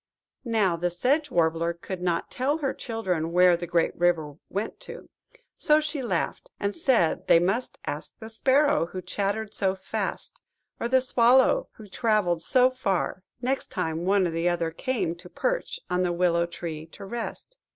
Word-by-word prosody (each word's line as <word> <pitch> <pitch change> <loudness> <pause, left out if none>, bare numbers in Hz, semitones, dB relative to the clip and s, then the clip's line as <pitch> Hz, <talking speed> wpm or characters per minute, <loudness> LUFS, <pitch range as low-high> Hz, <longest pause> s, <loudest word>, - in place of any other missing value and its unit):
Now, 200 -7 +2
the 175 +1 0
Sedge 275 - +1
Warbler 165 0 +1
could 180 +1 -7
not 175 -2 -1
tell 275 +5 0
her 280 -4 -1
children 185 -9 -2
where 180 0 +6
the 175 0 -5
great 170 0 +1
river 170 -4 +1 0.2
went 205 +3 -4
to; - - -10 0.5
so 300 -1 +4
she 300 -2 -2
laughed, 245 - -2
and 200 0 -1
said 255 - +1
they - - +7
must 195 +9 0
ask 150 +3 -6
the 220 - -9
Sparrow 265 - +3
who 185 - -6
chattered 205 +3 -2
so 190 -1 0
fast, 190 - -4 0.4
or 235 - -1
the 260 +1 +4
Swallow 255 0 +4
who 215 - -13
travelled 205 -5 +1
so 255 +7 +4
far, 195 -7 -1 0.2
next 265 +2 -1
time 165 -2 -2
one 195 +1 +3
or 165 - -4
other 170 -2 -1
came 235 -1 -2
to 180 +1 -13
perch - - -2
on 180 0 0
the 180 -1 +1
willow 170 -1 +2
tree 160 -2 -6
to 165 - -11
rest. 235 - -6
190 Hz, 170 wpm, -26 LUFS, 170-250 Hz, 0.5 s, they